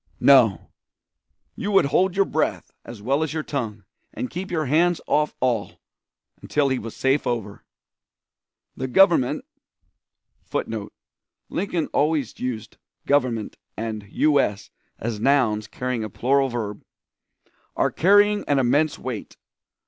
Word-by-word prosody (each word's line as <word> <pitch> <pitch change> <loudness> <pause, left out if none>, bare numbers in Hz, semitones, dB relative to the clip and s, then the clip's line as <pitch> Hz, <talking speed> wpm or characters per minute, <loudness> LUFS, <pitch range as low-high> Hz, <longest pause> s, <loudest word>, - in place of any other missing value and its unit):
"No; - - +5 0.8
you 205 - -4
would 195 - +5
hold 180 +6 +2
your 195 0 +3
breath - - -2
as 115 -3 -10
well 140 +6 +1
as 160 -1 -2
your 155 - -2
tongue, 110 -9 -4 0.3
and 125 - -5
keep 185 +2 -5
your 160 -3 -1
hands 170 +5 +2
off 150 -1 +1
all, 120 -5 0 0.7
until 145 -2 +1
he 130 -1 0
was 115 0 -8
safe 135 0 +1
over. 110 -4 -3 1.1
"The 130 - -3
government 165 -3 +3 1.0
[Footnote: 110 -2 -4 0.6
Lincoln 175 -4 -1
always 150 -5 0
used 125 -4 -5 0.3
"Government" 125 -6 0 0.2
and 110 -2 -4
"U. 150 +3 +3
S." 105 -6 -1 0.3
as 110 -1 -4
nouns 115 -5 +2
carrying 125 -3 -3
a 110 - -4
plural 135 +6 +1
verb.] 110 -4 -5 0.9
are - - +1
carrying 205 +3 +4
an 145 - +2
immense 145 +4 +2
weight. 125 -5 -6
135 Hz, 130 wpm, -23 LUFS, 115-155 Hz, 1.1 s, No